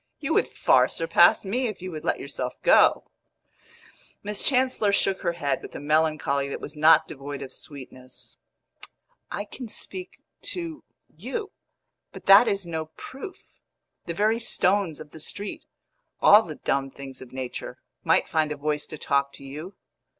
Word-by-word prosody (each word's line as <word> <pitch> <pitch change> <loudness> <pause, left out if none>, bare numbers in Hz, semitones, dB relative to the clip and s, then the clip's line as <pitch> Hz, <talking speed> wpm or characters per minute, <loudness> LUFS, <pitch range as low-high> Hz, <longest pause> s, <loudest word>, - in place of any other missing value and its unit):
"You - - -1
would - - +3
far - - +3
surpass 165 +3 +4
me 245 +6 0
if 215 - -5
you 185 0 -6
would 155 -2 -7
let - - 0
yourself - - -5
go." - - +5 1.1
Miss 210 0 -3
Chancellor 255 -6 +2
shook 195 -1 +1
her 170 - 0
head 145 -5 -1
with - - -10
a - - -4
melancholy 150 -2 +1
that - - -4
was 150 - -7
not 155 +2 +6
devoid 140 0 -7
of 130 -1 -9
sweetness. 130 -3 -11 0.9
"I 205 - -4
can 245 +3 -8
speak 365 - -7 0.4
to 335 -3 -6 0.3
you; 435 -4 -5 0.6
but - - -12
that 200 +5 +8
is 200 -3 0
no 160 -2 -4
proof. 275 +8 -9 0.6
The 170 - -3
very 215 +4 +2
stones 190 -7 +1
of 155 -1 -11
the 160 - -11
street 200 +6 -5 0.5
all 205 +2 +8
the 160 -8 -7
dumb 135 -1 -1
things 135 -1 -10
of 130 - -11
nature 130 -1 -6 0.3
might - - +3
find 155 -1 0
a - - -2
voice 150 +1 -2
to 155 - -8
talk 140 -1 +1
to 140 - -11
you. 155 +8 -8
160 Hz, 165 wpm, -25 LUFS, 145-205 Hz, 1.1 s, that